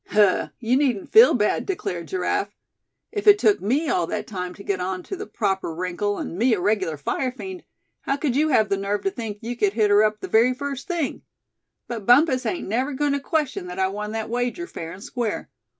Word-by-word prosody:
"Huh! 205 -3 +3
you 245 +2 +2
needn't 255 -9 0
feel 455 +3 +8
bad," 210 -3 +1
declared 180 - -3
Giraffe. 190 +3 -1 0.6
"If 420 -1 -4
it 415 0 +9
took 415 0 +3
me 270 +11 +1
all 175 - +1
that 210 +3 -3
time 180 -4 -5
to 200 - -11
get 200 -2 -1
on 185 0 -3
to - - -5
the 415 +3 -7
proper 195 -5 -1
wrinkle, 185 +4 -2
and 175 - -5
me 240 0 +4
a - - -4
regular 185 -5 0
fire 255 - -2
fiend, 365 +7 -8 0.4
how 275 - -1
could 285 -4 -1
you 305 +3 +3
have 220 -7 +3
the 195 - +1
nerve 200 +1 -2
to 390 - 0
think 225 - -5
you 235 +2 -4
could 205 -4 +1
hit 215 -2 +2
her 205 +1 +6
up 215 0 +1
the - - -6
very 240 +3 +4
first 275 0 -5
thing? 340 -6 -2 0.7
But 225 -5 -6
Bumpus 255 0 +5
ain't 355 - -3
never 255 +8 -1
going 290 +1 0
to 280 - 0
question 280 - -2
that 180 +1 -7
I 190 0 +1
won 210 +2 -5
that 220 -1 -3
wager, 245 +8 -1
fair 165 - -7
and 185 +3 -10
square. 235 -4 -3
225 Hz, 225 wpm, -23 LUFS, 195-275 Hz, 0.7 s, it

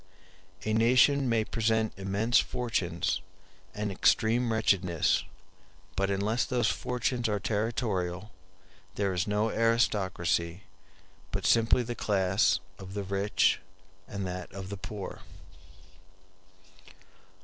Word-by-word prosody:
A 110 - 0
nation 125 +4 +4
may 115 -2 +2
present 110 0 0
immense 100 +5 +2
fortunes 95 -7 -1 0.5
and 105 -1 -2
extreme 115 +5 +2
wretchedness, 95 -7 +2 0.7
but 100 0 0
unless 105 +4 +1
those 120 -4 +1
fortunes 125 -1 -1
are 105 -1 0
territorial 105 -3 -2 0.6
there 100 -2 0
is 90 +2 -1
no 105 +2 +1
aristocracy, 95 -6 +1 0.7
but 95 -1 -3
simply 115 +3 +4
the 120 +1 -4
class 95 -4 +2 0.2
of 95 0 -9
the 100 - -2
rich 100 +1 +1 0.5
and 100 -1 -4
that 90 -1 -5
of 95 -1 -7
the 100 - -5
poor. 100 0 -7
105 Hz, 105 wpm, -29 LUFS, 95-115 Hz, 0.7 s, nation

